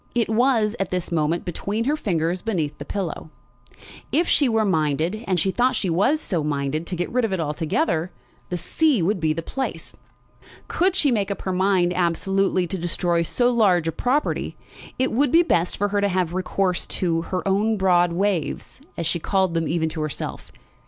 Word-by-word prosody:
It 235 Hz, -2 st, +1 dB
was, 225 Hz, -2 st, +2 dB
at 195 Hz, -, -1 dB
this 180 Hz, -1 st, -3 dB
moment, 165 Hz, +1 st, 0 dB
between 200 Hz, +5 st, -2 dB
her 285 Hz, +5 st, +1 dB
fingers 175 Hz, -, -1 dB
beneath 170 Hz, -10 st, -2 dB
the 145 Hz, -, -6 dB
pillow. 185 Hz, -4 st, -4 dB, 0.8 s
If 335 Hz, +3 st, +2 dB
she 280 Hz, -4 st, +3 dB
were 225 Hz, -1 st, +2 dB
minded, 165 Hz, +4 st, 0 dB
and 185 Hz, -2 st, +1 dB
she 190 Hz, +4 st, +1 dB
thought 250 Hz, +4 st, +2 dB
she 190 Hz, -5 st, -1 dB
was 230 Hz, -, +2 dB
so 175 Hz, -, -2 dB
minded, 150 Hz, +2 st, -2 dB
to 185 Hz, -, -2 dB
get 175 Hz, +1 st, -3 dB
rid 250 Hz, 0 st, +1 dB
of 225 Hz, -, 0 dB
it 190 Hz, -, -1 dB
altogether, 160 Hz, -, -1 dB, 0.4 s
the 180 Hz, -, -2 dB
sea 280 Hz, -, +1 dB
would 195 Hz, +3 st, +1 dB
be 160 Hz, -2 st, +1 dB
the 165 Hz, +2 st, -3 dB
place. 265 Hz, +9 st, -5 dB, 0.7 s
Could 370 Hz, +2 st, +1 dB
she 295 Hz, -7 st, +2 dB
make 205 Hz, -4 st, 0 dB
up 200 Hz, -, -4 dB
her 190 Hz, -, -2 dB
mind 185 Hz, -1 st, +2 dB
absolutely 185 Hz, +2 st, +1 dB
to 180 Hz, +2 st, -4 dB
destroy 175 Hz, 0 st, 0 dB
so 240 Hz, +9 st, +1 dB
large 190 Hz, -8 st, +3 dB
a -, -, +1 dB
property, 255 Hz, -, -1 dB, 0.4 s
it 260 Hz, +1 st, +1 dB
would 270 Hz, +3 st, +2 dB
be 335 Hz, +1 st, +6 dB
best 175 Hz, -, +1 dB
for 205 Hz, +1 st, 0 dB
her 205 Hz, 0 st, 0 dB
to 200 Hz, -, +3 dB
have 180 Hz, -2 st, 0 dB
recourse 185 Hz, 0 st, -1 dB
to 165 Hz, -3 st, 0 dB
"her 185 Hz, +1 st, -2 dB
own 210 Hz, +3 st, +2 dB
broad 175 Hz, -2 st, +3 dB
waves," 190 Hz, -, -2 dB, 0.2 s
as 170 Hz, -, -2 dB
she 170 Hz, +2 st, 0 dB
called 190 Hz, +1 st, +1 dB
them 165 Hz, -1 st, 0 dB
even 165 Hz, -1 st, 0 dB
to 160 Hz, 0 st, -5 dB
herself. 155 Hz, -1 st, -5 dB
185 Hz, 195 wpm, -23 LUFS, 170-220 Hz, 0.8 s, be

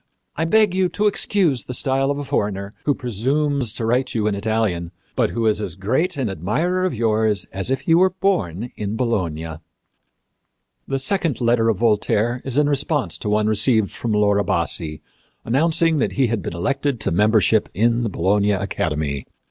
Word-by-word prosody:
I 160 Hz, -, -1 dB
beg 210 Hz, +2 st, +3 dB
you 185 Hz, -1 st, +1 dB
to 210 Hz, -, -1 dB
excuse 190 Hz, -, +1 dB
the 125 Hz, -, -4 dB
style 135 Hz, +1 st, +1 dB
of 140 Hz, -, -1 dB
a 145 Hz, -, -4 dB
foreigner 100 Hz, -5 st, -2 dB
who 145 Hz, -, +2 dB
presumes 130 Hz, +2 st, -1 dB
to 115 Hz, -, -3 dB
write 125 Hz, +3 st, 0 dB
you 110 Hz, -2 st, 0 dB
in 105 Hz, -, +1 dB
Italian, 100 Hz, -5 st, -1 dB, 0.3 s
but -, -, +2 dB
who 115 Hz, -1 st, -2 dB
is 105 Hz, -1 st, +2 dB
as 95 Hz, -5 st, -4 dB
great 135 Hz, -, -1 dB
an 130 Hz, -4 st, -1 dB
admirer 140 Hz, -, -1 dB
of 180 Hz, -, -1 dB
yours 110 Hz, -3 st, +1 dB
as 95 Hz, +4 st, -3 dB
if 135 Hz, -1 st, 0 dB
he 165 Hz, -, +1 dB
were 185 Hz, +3 st, +5 dB
born 125 Hz, -, -1 dB
in 105 Hz, +1 st, -4 dB
Bologna." 85 Hz, -10 st, -2 dB, 1.3 s
The 135 Hz, -, -1 dB
second 165 Hz, +1 st, 0 dB
letter 115 Hz, -2 st, +2 dB
of 110 Hz, -, +1 dB
Voltaire 115 Hz, +2 st, +1 dB
is 135 Hz, 0 st, -3 dB
in 150 Hz, -1 st, +4 dB
response 145 Hz, 0 st, 0 dB
to 105 Hz, -, -3 dB
one 105 Hz, 0 st, +2 dB
received 110 Hz, 0 st, +2 dB
from 115 Hz, -, -4 dB
Laura 105 Hz, -1 st, +3 dB
Bassi 80 Hz, -3 st, -2 dB, 0.4 s
announcing 160 Hz, +5 st, +2 dB
that -, -, 0 dB
he 135 Hz, -, +2 dB
had 115 Hz, -3 st, -1 dB
been 85 Hz, -, -5 dB
elected 140 Hz, +7 st, -1 dB
to -, -, 0 dB
membership 105 Hz, +3 st, +3 dB
in 115 Hz, +3 st, +2 dB
the 115 Hz, -, -1 dB
Bologna 100 Hz, +3 st, +1 dB
Academy. 75 Hz, -7 st, -2 dB
115 Hz, 180 wpm, -21 LUFS, 100-140 Hz, 1.3 s, were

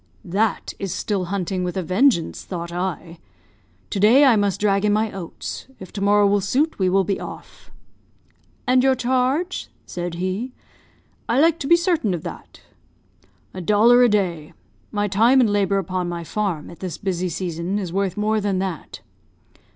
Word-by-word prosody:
"That 200 Hz, +4 st, -1 dB
is 195 Hz, -2 st, -3 dB
still 190 Hz, 0 st, -2 dB
hunting 185 Hz, 0 st, -2 dB
with 180 Hz, +1 st, -3 dB
a 185 Hz, -, -1 dB
vengeance, 185 Hz, -, +1 dB
thought 170 Hz, -2 st, -6 dB
I. 175 Hz, -2 st, -4 dB, 0.7 s
'To 200 Hz, -, -2 dB
day 240 Hz, +8 st, +6 dB
I 255 Hz, -4 st, +6 dB
must 205 Hz, -2 st, 0 dB
drag 200 Hz, -1 st, +2 dB
in 210 Hz, -, +3 dB
my 215 Hz, +1 st, +1 dB
oats. 185 Hz, +4 st, -7 dB
If 185 Hz, -, -11 dB
to 200 Hz, -, -5 dB
morrow 205 Hz, +1 st, +4 dB
will 200 Hz, 0 st, +3 dB
suit, 275 Hz, +11 st, 0 dB
we 185 Hz, -1 st, +2 dB
will 195 Hz, +1 st, +3 dB
be 195 Hz, +1 st, -2 dB
off.' -, -, -10 dB, 1.0 s
"'And 255 Hz, -1 st, +4 dB
your 265 Hz, 0 st, +4 dB
charge?' 260 Hz, +8 st, 0 dB, 0.2 s
said 175 Hz, -1 st, -5 dB
he. 185 Hz, +8 st, -3 dB, 0.8 s
'I 240 Hz, -, +3 dB
like 330 Hz, 0 st, +3 dB
to 275 Hz, -, -4 dB
be 340 Hz, -, +7 dB
certain 335 Hz, -, +1 dB
of 165 Hz, -, -7 dB
that.' -, -, -9 dB, 0.9 s
"'A 185 Hz, -, -6 dB
dollar 220 Hz, +6 st, +5 dB
a 245 Hz, -, +6 dB
day. 175 Hz, -7 st, -1 dB, 0.4 s
My 205 Hz, 0 st, 0 dB
time 225 Hz, +7 st, +4 dB
and 230 Hz, -5 st, +3 dB
labour 200 Hz, -1 st, +2 dB
upon 185 Hz, -2 st, -2 dB
my 170 Hz, -1 st, -4 dB
farm, 175 Hz, -2 st, -3 dB
at 170 Hz, -, -13 dB
this 185 Hz, -3 st, -5 dB
busy 185 Hz, -2 st, -2 dB
season, 170 Hz, +2 st, -3 dB
is 185 Hz, -4 st, -4 dB
worth 195 Hz, -1 st, -1 dB
more 215 Hz, +1 st, +1 dB
than 200 Hz, -2 st, 0 dB
that.' 185 Hz, -5 st, -5 dB
200 Hz, 175 wpm, -22 LUFS, 180-220 Hz, 1.0 s, be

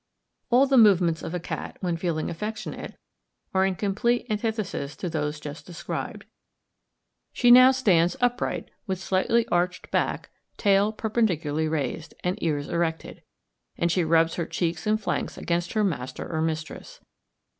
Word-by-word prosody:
All 255 Hz, +2 st, +5 dB
the 270 Hz, -2 st, +4 dB
movements 180 Hz, -7 st, +4 dB
of 170 Hz, -, -5 dB
a -, -, -1 dB
cat, 170 Hz, -, -6 dB
when 175 Hz, -3 st, -1 dB
feeling 165 Hz, -2 st, -2 dB
affectionate, 215 Hz, +6 st, -6 dB, 0.6 s
are 190 Hz, 0 st, +3 dB
in 190 Hz, -, -1 dB
complete 215 Hz, +5 st, 0 dB
antithesis 210 Hz, -9 st, -2 dB
to 180 Hz, -, -4 dB
those 150 Hz, -1 st, -2 dB
just 150 Hz, +1 st, -8 dB
described. 175 Hz, -1 st, -5 dB, 1.1 s
She 245 Hz, -2 st, +4 dB
now 255 Hz, +1 st, +9 dB
stands 185 Hz, -10 st, +3 dB
upright, 245 Hz, 0 st, -1 dB, 0.2 s
with 190 Hz, -1 st, -1 dB
slightly 195 Hz, +5 st, +1 dB
arched 175 Hz, -2 st, -1 dB
back, -, -, -1 dB, 0.3 s
tail 200 Hz, 0 st, +3 dB
perpendicularly 175 Hz, -9 st, 0 dB
raised, 155 Hz, +1 st, -3 dB
and 180 Hz, +1 st, -2 dB
ears 145 Hz, -3 st, -1 dB
erected; 165 Hz, -2 st, -2 dB, 0.6 s
and 170 Hz, 0 st, +1 dB
she 180 Hz, +1 st, +2 dB
rubs 165 Hz, 0 st, +3 dB
her 170 Hz, -2 st, -2 dB
cheeks 175 Hz, +4 st, -2 dB
and 215 Hz, 0 st, +2 dB
flanks 215 Hz, -, -3 dB
against 170 Hz, 0 st, -2 dB
her 215 Hz, -1 st, +2 dB
master 140 Hz, -10 st, -3 dB
or 160 Hz, -2 st, -2 dB
mistress. 160 Hz, -, -4 dB
180 Hz, 145 wpm, -26 LUFS, 160-215 Hz, 1.1 s, now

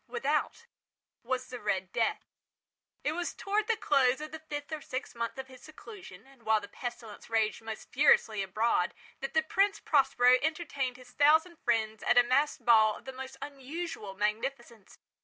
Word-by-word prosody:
Without 465 Hz, 0 st, -1 dB, 0.6 s
was 255 Hz, +1 st, -2 dB
the 250 Hz, -, -6 dB
"Red 190 Hz, -3 st, -2 dB
Death". 230 Hz, -1 st, 0 dB, 0.8 s
It 295 Hz, -, +1 dB
was 345 Hz, +2 st, -3 dB
towards 415 Hz, +1 st, -1 dB
the 460 Hz, -, +2 dB
close 265 Hz, -5 st, +3 dB
of 305 Hz, 0 st, -7 dB
the 315 Hz, -, -7 dB
fifth 290 Hz, -2 st, -7 dB
or 310 Hz, -, -4 dB
sixth 255 Hz, -2 st, -5 dB
month 235 Hz, +2 st, -3 dB
of 265 Hz, -, -5 dB
his 260 Hz, -1 st, -14 dB
seclusion, 380 Hz, +4 st, -12 dB
and 270 Hz, -2 st, -20 dB
while 220 Hz, -1 st, +3 dB
the 205 Hz, -, -10 dB
pestilence 240 Hz, -3 st, -8 dB
raged 225 Hz, -1 st, +1 dB
most 225 Hz, -1 st, -8 dB
furiously 225 Hz, -7 st, +4 dB
abroad, 195 Hz, -1 st, 0 dB, 0.2 s
that 270 Hz, -, -5 dB
the 315 Hz, -, +4 dB
Prince 395 Hz, +5 st, +1 dB
Prospero 255 Hz, -3 st, +4 dB
entertained 285 Hz, -5 st, -2 dB
his 250 Hz, -1 st, -15 dB
thousand 315 Hz, +5 st, +4 dB
friends 220 Hz, -2 st, 0 dB
at 245 Hz, -, +2 dB
a 245 Hz, -, +8 dB
masked 260 Hz, 0 st, +1 dB
ball 220 Hz, -3 st, +6 dB
of -, -, -17 dB
the 265 Hz, -, -7 dB
most 265 Hz, +1 st, -8 dB
unusual 280 Hz, -, -6 dB
magnificence. 220 Hz, +1 st, -3 dB
255 Hz, 175 wpm, -30 LUFS, 225-300 Hz, 0.8 s, a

